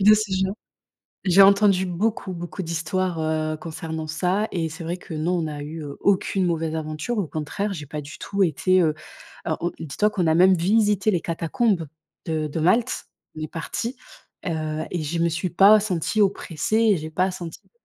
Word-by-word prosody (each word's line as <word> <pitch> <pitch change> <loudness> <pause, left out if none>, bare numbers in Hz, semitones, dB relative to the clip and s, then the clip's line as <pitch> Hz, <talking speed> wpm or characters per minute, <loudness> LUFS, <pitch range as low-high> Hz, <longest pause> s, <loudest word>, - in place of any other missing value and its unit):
de 210 +2 +8
ce 215 -2 -1
genre. 190 +1 -2 0.7
J'ai 190 +1 +6
entendu 200 -1 +5
beaucoup, 190 +2 -1
beaucoup 175 +2 -6
d'histoires, 170 +1 -2
heu, 155 0 -1
concernant 160 -1 -5
ça 180 +7 0
et 165 -3 -1
c'est 165 +2 -8
vrai 170 +2 -2
que 180 -1 -11
non, 155 +3 -1
on - - 0
n'a 150 -2 -4
eu, 155 +2 -6
heu, 140 -1 -7
aucune 195 -1 +2
mauvaise 165 -2 -1
aventure, 155 +9 -3
au 195 - 0
contraire, 175 +7 -3
j'ai 150 - -6
pas 150 +2 -5
du 145 0 -10
tout 200 0 -1
été, 185 +2 +3
heu, 155 -3 +2 0.5
alors, 160 -2 -1
heu, 175 - +1
on - - -6
dis-toi 160 +8 +1
qu'on 190 -5 -1
a 160 - +4
même 185 +3 +6
visité 205 +3 +2
les 180 -5 +1
catacombes 170 +3 0 0.4
de 160 -2 -1
de 150 +2 -3
Malte, 190 +9 +2 0.3
on - - -6
est 155 - -3
parti, 230 +9 -4 0.5
heu, 155 -2 -2
et 175 -3 -2
je 160 +3 -2
me 170 - +3
suis 170 +2 -2
pas 200 +5 +7
sentie 200 +1 0
oppressée 195 -1 0 0.2
et - - 0
j'ai 155 -1 -6
pas 185 +4 +1
senti 175 -3 -7
de - - -32
170 Hz, 200 wpm, -24 LUFS, 160-195 Hz, 0.7 s, de